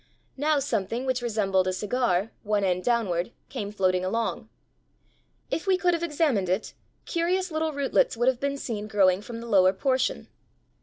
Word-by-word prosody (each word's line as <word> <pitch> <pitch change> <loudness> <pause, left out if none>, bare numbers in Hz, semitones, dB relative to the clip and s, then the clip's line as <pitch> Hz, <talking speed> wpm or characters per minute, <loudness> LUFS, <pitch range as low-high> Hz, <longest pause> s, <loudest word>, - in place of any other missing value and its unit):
Now 300 +2 +2
something 240 -3 -1
which 255 -1 0
resembled 195 -5 +1
a 185 - 0
cigar, 210 -1 0
one 210 -1 0
end 180 -1 0
downward, 215 -6 0 0.2
came 205 -1 -4
floating 185 -3 +1
along. 225 +3 -2 1.0
If 330 - -2
we 380 -1 +4
could 360 -2 +2
have 335 - -1
examined 295 - +1
it, 190 +4 -1 0.3
curious 360 +2 0
little 315 0 -1
rootlets 285 - +1
would 240 +2 +1
have 260 -2 +3
been 280 +1 -1
seen 215 -6 -4
growing 195 -3 +3
from 230 +2 -7
the 235 - -8
lower 190 -4 +5
portion. 255 +5 0
230 Hz, 165 wpm, -26 LUFS, 195-280 Hz, 1.0 s, lower